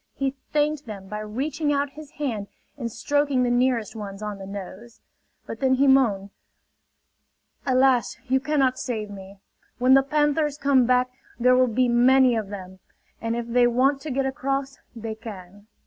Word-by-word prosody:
He 270 -1 -1 0.2
thanked 300 -2 0
them 200 -3 -8
by 210 +2 -5
reaching 275 +8 -2
out 285 -1 0
his 300 0 -12
hand 230 -9 -3 0.3
and 235 -5 -5
stroking 285 0 +1
the 245 - +1
nearest 245 -3 +1
ones 205 -1 -7
on 210 -1 -5
the 195 - -8
nose. 200 +4 -9 0.5
But 225 - -7
then 260 -1 +3
he 275 +2 +3
moaned: 225 -8 +3 1.4
"Alas! 255 -1 +3
You 265 +1 +2
cannot 265 -3 +1
save 215 -4 -4
me! 195 0 -11 0.4
When 255 +1 +4
the 270 - +7
panthers 295 +1 +1
come 270 -4 +3
back 250 0 +2 0.3
there 250 +1 +5
will 255 0 +4
be 250 +2 +1
many 250 +1 +5
of 215 -3 -3
them; 190 -2 -9 0.4
and 230 0 -1
if 235 0 -3
they 240 +1 +3
want 265 +3 +2
to 310 - -6
get 270 0 0
across 275 0 -2 0.2
they 225 -1 -5
can." 205 -2 -11
250 Hz, 170 wpm, -24 LUFS, 215-275 Hz, 1.4 s, the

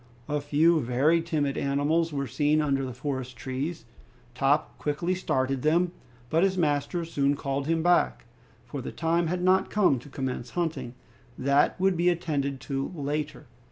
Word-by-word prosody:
A 150 0 -1
few 155 +3 +3
very 140 +7 +2
timid 150 -4 -1
animals 145 +4 +1
were 140 -1 -2
seen 150 +5 +1
under 140 -3 +1
the 130 - -4
forest 130 -1 -4
trees. 135 +8 -4 0.5
Top 140 +4 +1
quickly 160 +5 -1
started 135 -7 -1
them, 170 +4 +2 0.4
but 160 +1 +3
his 190 0 +2
master 150 +1 0
soon 140 -3 +1
called 140 0 -3
him 165 0 +1
back, 175 -7 +2 0.4
for 130 +3 -6
the - - -6
time 165 +1 0
had 180 +2 -2
not 185 +1 +3
come 185 -11 +3
to 145 - -13
commence 130 -3 -4
hunting; 160 -8 -2 0.4
that 140 +6 +2
would 190 0 +3
be 175 +1 +3
attended 145 -6 -1
to 135 -1 -3
later. 145 -2 -3
145 Hz, 160 wpm, -27 LUFS, 135-165 Hz, 0.5 s, few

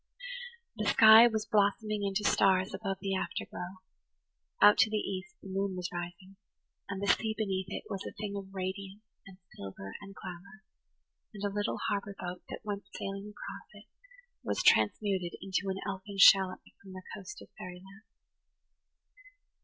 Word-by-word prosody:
The 215 - -2
sky 220 +2 +9
was 220 -2 -1
blossoming 210 0 +1
into 200 +1 0
stars 190 0 +3
above 195 -3 -3
the 195 -1 -1
afterglow; 185 0 -5 0.8
out 205 0 +7
to 235 -3 +6
the 215 - 0
east 190 -3 -4
the - - -9
moon 195 0 -1
was 180 -1 -4
rising, 175 +2 -7 0.5
and 195 -1 -3
the 200 - -2
sea 220 -1 -2
beneath 190 -3 -1
it - - -5
was 195 -1 -4
a - - -6
thing 205 -1 -5
of 195 -1 -6
radiance 195 +2 -5 0.2
and 190 -1 -13 0.2
silver 95 0 -8
and 195 -1 -11
glamour; 190 +5 -10 0.7
and 200 - -7
a 200 -1 -1
little 205 0 -1
harbour 200 0 -2
boat 180 0 -5
that - - -6
went 205 -1 -4
sailing 195 +1 -5
across 210 - -9
it 210 0 -14 0.6
was - - -1
transmuted 180 - +3
into 195 0 -2
an 190 - -2
elfin 195 0 -5
shallop 195 -1 +7 0.2
from 195 -1 -12
the 185 0 -9
coast 200 +3 -9
of - - -13
fairyland. 185 +3 -10
195 Hz, 160 wpm, -31 LUFS, 185-205 Hz, 0.8 s, sky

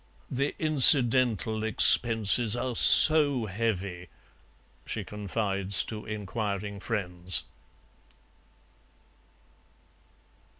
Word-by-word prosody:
"The 140 +3 -3
incidental 125 - +2
expenses 110 +1 +3
are 125 +1 -5
so 145 0 +4
heavy," 95 -4 -5 0.7
she - - -7
confides 100 -2 -3
to 110 -1 -9
inquiring 105 -1 -6
friends. 90 -5 -2
110 Hz, 60 wpm, -26 LUFS, 100-120 Hz, 0.7 s, so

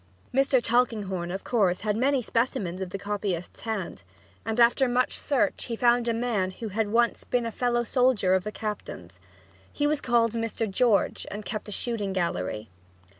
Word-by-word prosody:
Mr. 270 0 +4
Tulkinghorn, 210 -8 0
of 190 +2 -4
course, 195 -7 +1
had 210 -1 0
many 260 +2 +2
specimens 220 -7 -1
of 190 - -3
the 195 - -4
copyist's 200 -3 -3
hand, 220 -5 -4 0.4
and 225 +1 -2
after 240 +3 +5
much 245 +1 +1
search 280 -4 0
he 235 - -3
found 240 0 +3
a - - +3
man 225 -6 0
who 215 +4 -6
had 215 +2 0
once 235 +1 +2
been 245 -1 0
a 230 - -2
fellow 240 +1 0
soldier 245 -7 +2
of 190 -1 +2
the 210 - -4
captain's. 95 - -6 0.5
He 290 - -1
was 295 0 +1
called 235 -2 +2
"Mr. 230 0 -2
George," 215 +1 +1
and 210 0 -6
kept 215 0 -4
a - - -6
shooting 210 -3 -2
gallery. 110 - -2
225 Hz, 175 wpm, -27 LUFS, 195-245 Hz, 0.5 s, after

